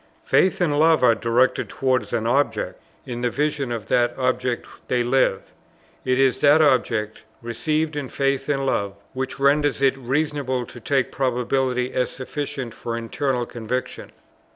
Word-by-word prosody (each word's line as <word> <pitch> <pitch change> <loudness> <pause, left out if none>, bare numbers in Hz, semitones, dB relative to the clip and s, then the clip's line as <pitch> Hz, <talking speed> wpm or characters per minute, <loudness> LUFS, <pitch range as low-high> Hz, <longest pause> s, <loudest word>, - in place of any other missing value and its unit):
Faith 190 - +3
and 150 -4 +2
love 160 -2 +4
are 120 -2 +6
directed 120 +3 +1
towards 130 -1 0
an 115 -2 -1
Object; 120 -3 0 0.2
in 120 -1 -5
the 125 - +1
vision 145 -1 -1
of 115 -3 -4
that 120 -1 +1
Object 125 -1 -1 0.2
they 125 -1 +1
live; 120 -5 +1 0.5
it 130 0 +1
is 130 -1 +3
that 145 +2 +5
Object, 115 -7 +1 0.2
received 155 +7 -1
in 140 -3 -4
faith 135 0 -1
and 135 -2 0
love, 100 -6 -1 0.2
which 130 0 -4
renders 145 +1 +3
it 135 -1 +3
reasonable 135 -1 -1
to 120 - -11
take 135 +2 0
probability 125 0 0
as 125 -1 0
sufficient 135 -2 -5
for 115 0 -5
internal 125 +2 -1
conviction. 120 +2 -5
130 Hz, 155 wpm, -23 LUFS, 120-140 Hz, 0.5 s, are